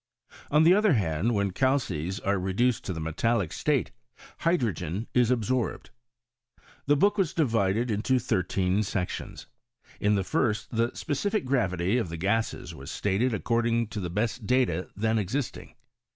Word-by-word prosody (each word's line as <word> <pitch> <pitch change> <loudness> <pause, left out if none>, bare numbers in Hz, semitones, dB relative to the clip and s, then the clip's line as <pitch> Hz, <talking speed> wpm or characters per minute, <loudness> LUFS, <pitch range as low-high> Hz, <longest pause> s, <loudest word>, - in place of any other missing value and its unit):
On 150 +2 +4
the 170 +3 +7
other 210 -2 +4
hand, 100 - 0
when 100 -1 0
calces 95 - 0
are 100 -1 0
re 95 +1 -2
duced 120 +3 +1
to - - -3
the 80 - -5
metallic 90 +4 0
state 145 -4 0 0.5
hydrogen 110 - 0
is 125 -2 +3
absorbed. 125 0 -1 1.0
The 145 - +5
book 205 +7 +2
was 180 -5 0
divided 115 - +1
into 110 +5 +1
thirteen 95 -4 0
sections. 100 -3 -4 0.5
In 105 0 +2
the 100 - 0
first 110 - -1
the 115 +1 +3
speci^c 200 +5 -1
gravity 100 -5 +1
of 95 - -3
the 85 - -5
gases 105 +6 -1
was 70 +3 -9
stated 105 +8 0
ac< 110 - -3
cording 115 0 +1
to 105 - -5
the 90 -3 -3
best 110 +4 -2
data 125 -9 +1
then 110 +2 +1
existing. 115 +7 -4
110 Hz, 155 wpm, -27 LUFS, 95-125 Hz, 1.0 s, the